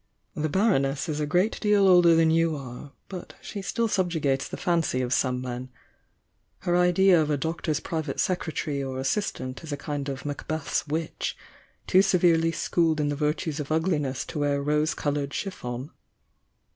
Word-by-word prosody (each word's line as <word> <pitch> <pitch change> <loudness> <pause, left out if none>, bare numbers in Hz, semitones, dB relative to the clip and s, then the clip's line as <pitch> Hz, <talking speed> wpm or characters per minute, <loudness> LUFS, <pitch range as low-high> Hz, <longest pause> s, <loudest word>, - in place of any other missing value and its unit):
"The 155 +1 -2
Baroness 145 -7 +1
is 155 -2 -2
a 150 - -1
great 180 +8 +1
deal 210 -2 +4
older 175 -2 +7
than 165 -1 +4
you 165 -1 +2
are, 135 0 -8 0.2
but 185 -3 -8
she 205 - -6
still 230 +4 0
subjugates 160 -9 0
the - - -6
fancy 170 -8 +1
of 125 0 -1
some 125 -1 +1
men. 125 0 -5 0.9
Her 175 -2 +1
idea 180 0 +5
of 155 - -1
a 150 - +1
doctor's 160 0 -2
private 155 -4 -4
secretary 160 -5 -1
or 130 -1 -4
assistant 130 -1 -2
is 160 - -7
a 145 - -2
kind 145 -1 -4
of 135 0 -6
Macbeth's 145 +1 -3
witch, 160 +2 -3 0.5
too 185 - +5
severely 170 -4 +3
schooled 165 -1 +1
in 145 -1 +1
tixe 145 - -3
virtues 150 +1 -1
of 150 0 -5
ugliness 155 -5 0
to 155 - -5
wear 145 -1 +1
rosy 150 +2 +1
coloured 145 -1 -2
chiffon!" 130 -7 -5
155 Hz, 170 wpm, -26 LUFS, 140-175 Hz, 0.9 s, older